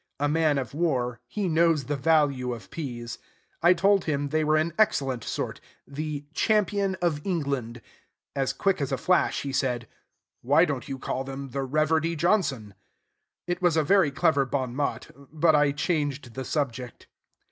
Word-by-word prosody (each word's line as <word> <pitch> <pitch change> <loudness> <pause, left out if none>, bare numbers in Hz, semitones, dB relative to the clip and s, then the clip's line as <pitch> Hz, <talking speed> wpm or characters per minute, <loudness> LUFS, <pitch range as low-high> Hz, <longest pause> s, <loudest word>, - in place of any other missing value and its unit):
A 145 - +1
man 155 -1 +2
of 130 -3 -3
war, 130 -7 0
he 195 +9 -2
knows 165 -2 +3
the 145 +3 -2
value 140 -4 +2
of 115 - -13
peas. 120 -6 -6 0.4
I 175 +2 +6
told 195 +2 +3
him 145 -2 -1
they 155 +2 +1
were 155 0 +2
an 155 +1 +1
excellent 135 - +2
sort, - - -4 0.3
"The 145 0 -5
Champion 200 -2 +1
of 155 -4 +1
England." 140 - -2 0.5
As 135 -2 0
quick 195 -5 0
as 140 - -2
a 135 - 0
flash 180 +8 +1
he 140 -1 -4
said, 125 -3 -1 0.5
"Why 145 +7 +4
don't 140 -2 -4
you 135 - -4
call 130 0 -3
them 135 0 -7
'The 135 +2 -3
Reverdy 155 +3 +1
Johnson'?" 145 - 0 0.7
It 175 +1 -3
was 175 -3 +3
a 160 - +3
very 190 0 +4
clever 140 +1 +2
bon 130 -2 -2
mot; 145 0 -2 0.2
but 160 0 +3
I 145 -1 +4
changed 145 -4 -2
the 130 +1 -5
subject. 125 -5 -3
145 Hz, 170 wpm, -26 LUFS, 135-165 Hz, 0.7 s, I